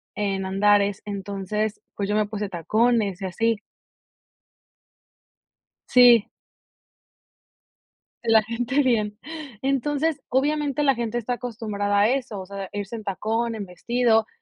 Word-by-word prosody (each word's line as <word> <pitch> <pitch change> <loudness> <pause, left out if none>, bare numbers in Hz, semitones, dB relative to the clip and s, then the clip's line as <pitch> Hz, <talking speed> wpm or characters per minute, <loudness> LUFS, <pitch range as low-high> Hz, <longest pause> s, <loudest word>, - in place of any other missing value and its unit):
en 195 -2 -1
Andares. 200 +1 +2
Entonces, 200 +1 -3 0.2
pues 200 -1 -3
yo 205 - +1
me 215 0 +2
puse 210 -1 -4
tacones 210 +2 +1
y - - -3
así. 225 +4 0 2.3
Sí. 245 -3 +7 2.0
De 235 - -1
la 220 -1 +7
gente 245 +5 0
bien. 215 -5 0 0.4
Entonces, 290 +3 0
obviamente, 290 +2 +1
la 275 -2 +4
gente 235 -1 -2
está 240 +1 -2
acostumbrada 215 -4 -2
a 210 - +5
eso, 250 -5 -2
o 185 - -8
sea, 195 0 -6
irse 205 +2 -4
en 220 - -9
tacón, 225 +4 -1
en 210 -3 -5
vestido, 225 +4 +1
220 Hz, 125 wpm, -24 LUFS, 200-245 Hz, 2.3 s, Sí